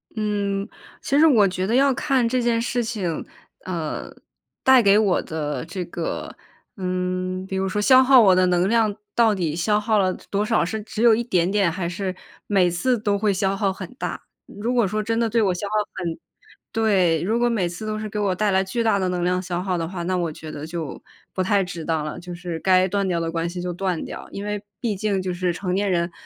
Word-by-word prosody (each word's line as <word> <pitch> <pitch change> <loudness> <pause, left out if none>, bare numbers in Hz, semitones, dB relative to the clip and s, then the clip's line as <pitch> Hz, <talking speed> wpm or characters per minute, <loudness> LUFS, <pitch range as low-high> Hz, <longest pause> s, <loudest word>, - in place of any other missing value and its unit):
嗯， 205 -2 -1 0.3
其 280 - +1
实 320 - +7
我 220 -9 +5
觉 185 0 -2
得 230 - +1
要 275 +1 +4
看 265 -3 +1
这 250 +2 0
件 235 -1 +1
事 245 0 -1
情， 205 -8 -3 0.4
呃， 170 -4 -4 0.5
带 260 -1 +7
给 200 -1 +5
我 205 -4 +2
的 150 -2 -4
这 180 +1 -5
个， 170 -1 -5 0.4
嗯， 185 0 -2
比 190 0 -5
如 190 0 0
说 205 +3 -2
消 260 +3 +7
耗 260 0 +7
我 195 -5 +6
的 185 0 +4
能 180 +1 +2
量 220 -2 +2 0.2
到 225 -3 +4
底 165 -4 -1
消 210 +5 +1
耗 215 -1 +1
了 185 -1 +2 0.2
多 205 +1 +1
少， 220 -5 +2
是 215 +5 -3
只 220 +1 -4
有 235 -1 +7
一 235 +2 +1
点 180 -6 +1
点， 200 -4 +2
还 175 0 -3
是 185 +1 -3 0.3
每 185 -4 +3
次 245 +9 +1
都 205 -2 0
会 210 -1 +2
消 195 0 0
耗 195 -1 +1
很 190 +2 -8
大。 - - -4 0.2
如 230 +5 -3
果 235 -5 +3
说 215 +3 -2
真 225 +1 -1
的 230 -1 +1
对 230 +1 +2
我 190 - +2
消 200 +3 -4
耗 210 - -6 0.2
很 170 -2 -4 0.5
对， 190 -8 +2
如 225 +5 0
果 240 0 +3
每 200 -7 0
次 180 +5 -7
都 215 - -2
是 215 - -4
给 210 - -4
我 195 -3 +1
带 210 +1 +1
来 190 0 +3
巨 210 +5 -2
大 220 -3 +2
的 185 - 0
能 180 -1 -1
量 180 +1 +1
消 180 -1 -3
耗 185 -1 -1
的 165 -1 -2
话， 175 -1 -5
那 185 +2 -1
我 170 -3 -1
觉 155 0 -9
得 155 +1 -7
就 165 -4 -5 0.3
不 185 - -1
太 195 +1 +2
值 175 -2 -6
当 160 -1 -1
了， 150 - -5
就 175 0 -8
是 170 -2 -5
该 185 +1 +4
断 200 +1 0
掉 175 -2 0
的 165 0 -2
关 165 0 -2
系 180 - -6
就 180 -1 -3
断 180 -2 -2
掉。 - - -8
因 200 - -6
为 210 0 -3 0.2
毕 225 -4 -1
竟 200 0 -1
就 185 -1 -2
是 180 0 0
成 180 +1 -3
年 200 +1 +1
人， 170 -1 0
190 Hz, 255 characters per minute, -23 LUFS, 180-215 Hz, 0.5 s, 实